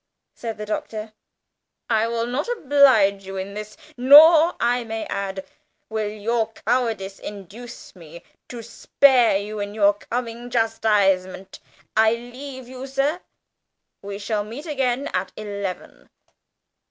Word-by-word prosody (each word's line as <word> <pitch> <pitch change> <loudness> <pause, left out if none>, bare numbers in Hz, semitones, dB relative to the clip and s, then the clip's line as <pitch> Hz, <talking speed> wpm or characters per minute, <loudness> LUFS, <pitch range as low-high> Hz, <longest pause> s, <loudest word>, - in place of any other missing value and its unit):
said 225 -2 -6
the 210 - -6
Doctor. 215 0 -5 0.7
"I 220 -1 +2
shall 230 0 -2
not 250 +5 -3
oblige 265 - +3
you 195 0 -7
in 190 +1 -5
this. 210 +3 -8 0.2
Nor, 310 +6 +7
I 240 +1 +1
may 225 -1 -5
add, 195 -1 -4 0.4
will 220 -1 -2
your 225 +2 -2
cowardice 225 -6 -1
induce 210 +5 -10
me 170 -1 -13 0.3
to 235 -2 -8
spare 245 -1 +3
you 210 +1 -6
in 205 0 -5
your 205 -1 +4
coming 235 +3 -5
chastisement. 205 -5 0 0.4
I 220 +1 +4
leave 255 +2 -9
you, 260 +1 -8
sir 275 +6 -1 0.8
we 200 0 -6
shall 210 0 -2
meet 230 +9 -9
again 270 -3 -1
at 185 0 -2
eleven!" 200 -3 -6
225 Hz, 130 wpm, -22 LUFS, 205-250 Hz, 0.8 s, Nor